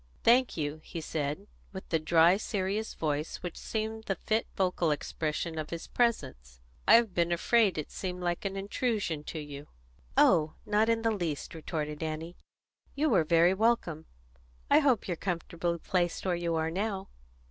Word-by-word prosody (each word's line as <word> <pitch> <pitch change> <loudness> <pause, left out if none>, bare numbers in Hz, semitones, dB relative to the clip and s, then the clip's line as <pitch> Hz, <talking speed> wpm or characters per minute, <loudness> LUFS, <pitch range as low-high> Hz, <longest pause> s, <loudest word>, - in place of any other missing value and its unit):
"Thank 245 -1 +4
you," 150 0 -3
he 170 - -6
said, 155 +3 -3 0.3
with 190 - -8
the 160 - +2
dry, 165 +3 +5
serious 205 0 -2
voice 150 +1 -2
which 180 - -5
seemed 220 0 -4
the 195 - -1
fit 220 +5 -1
vocal 180 -3 +1
expression 155 +2 -2
of 155 - -4
his 170 -1 -5
presence; 130 - -1 0.3
"I 225 - +9
have 230 -4 +4
been 170 0 +1
afraid 205 +3 +3
that 155 - -1
it - - -13
seemed 180 -1 -4
like 175 -1 -1
an 195 -1 -3
intrusion 200 - -1
to - - -6
you." 145 -1 -7 0.5
"Oh, 155 -1 +4
not 210 +1 +2
the 225 0 +2
least," 170 -8 -3
retorted 155 -2 -4
Annie. 160 +2 -4 0.6
"You 300 +2 +2
were 185 -7 +4
very 170 +3 +4
welcome. 190 -7 0 0.6
I 290 - +8
hope 275 -6 +2
you're 175 - -1
comfortably 170 -1 -2
placed 175 +1 -1
where 185 - +1
you 170 -1 -1
are 160 0 0
now?" 195 +1 -2
175 Hz, 170 wpm, -30 LUFS, 160-210 Hz, 0.6 s, I